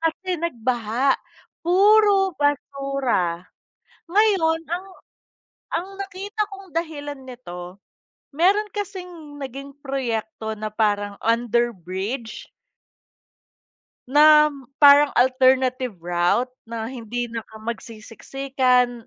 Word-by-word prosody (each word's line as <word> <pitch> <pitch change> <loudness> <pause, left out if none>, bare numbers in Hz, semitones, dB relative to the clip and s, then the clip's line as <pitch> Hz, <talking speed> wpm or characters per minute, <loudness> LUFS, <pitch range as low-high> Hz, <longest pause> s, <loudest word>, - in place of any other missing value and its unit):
kasi 330 +2 -2
nagbaha, 245 -3 0 0.5
puro 395 +1 +4
basura. 275 - -1 0.7
Ngayon 345 -5 +2
ang 355 +4 -4 0.9
ang 350 +3 -5
nakita 400 +2 -5
kong 390 -3 -12
dahilan 290 -4 -4
nito, 185 -8 -9 0.6
meron 390 +7 +3
kasing 360 -7 -7
naging 275 +1 -7
proyekto 225 -5 -3
na 215 0 -4
parang 205 -2 0
underbridge 230 -1 -1 1.6
nam 300 -2 +5 0.2
parang 285 0 +8
alternative 255 -1 +3
route 175 +8 +1 0.2
na 230 +1 -5
hindi 240 -1 -4
na 230 - -4
ka - - -19
magsisiksikan, 245 +2 -1
265 Hz, 85 wpm, -23 LUFS, 230-325 Hz, 1.6 s, parang